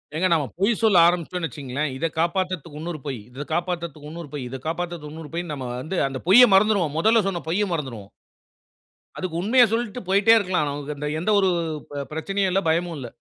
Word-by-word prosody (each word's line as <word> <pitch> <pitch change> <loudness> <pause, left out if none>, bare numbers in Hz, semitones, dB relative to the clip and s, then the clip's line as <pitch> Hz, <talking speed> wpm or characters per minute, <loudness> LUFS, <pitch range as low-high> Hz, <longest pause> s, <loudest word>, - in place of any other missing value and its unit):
ஏங்க 180 +4 +2
நாம 160 -3 +2 0.2
பொய் 200 +5 +3
சொல்ல 215 -5 +4
ஆரம்பிச்சட்டோம்னு 175 0 0
வச்சுக்கோங்களேன், 145 0 -4
இத 135 - -2
காப்பாத்துறதுக்கு 170 -3 -1
இன்னொரு 165 -1 -5
பொய். 135 -3 -3
இத 130 +3 -7
காப்பாத்துறதுக்கு 170 -4 -3
இன்னொரு 165 -2 -8
பொய், 140 -4 -4
இத 135 - -5
காப்பாத்துறதற்கு 170 -2 -4
இன்னொரு 160 -1 -9
பொய்ன்னு 170 -2 -3
நம்ம 130 -3 -5
வந்து, 170 +7 -4
அந்த 135 -1 -5
பொய்ய 230 +7 +9
மறந்துருவோம். 190 -6 +3
மொதல்ல 220 +5 +4
சொன்ன 180 -3 -2
பொய்ய 200 +5 +1
மறந்துருவோம். 125 -11 -5 1.1
அதுக்கு 180 -3 -4
உண்மைய 240 +6 +5
சொல்லிட்டு 235 0 -2
போய்கிட்டே 200 +3 +5
இருக்கலாம். 180 -7 0 0.4
அ - - -1
எந்த 180 +6 0
ஒரு 190 -1 +3 0.4
ப 145 -1 -4
பிரச்சனையும் 195 +4 -1
இல்ல, 195 +2 +2
ப - - +4
பயமும் 170 +1 0
இல்ல. 125 - -6
170 Hz, 185 wpm, -23 LUFS, 150-190 Hz, 1.1 s, பொய்ய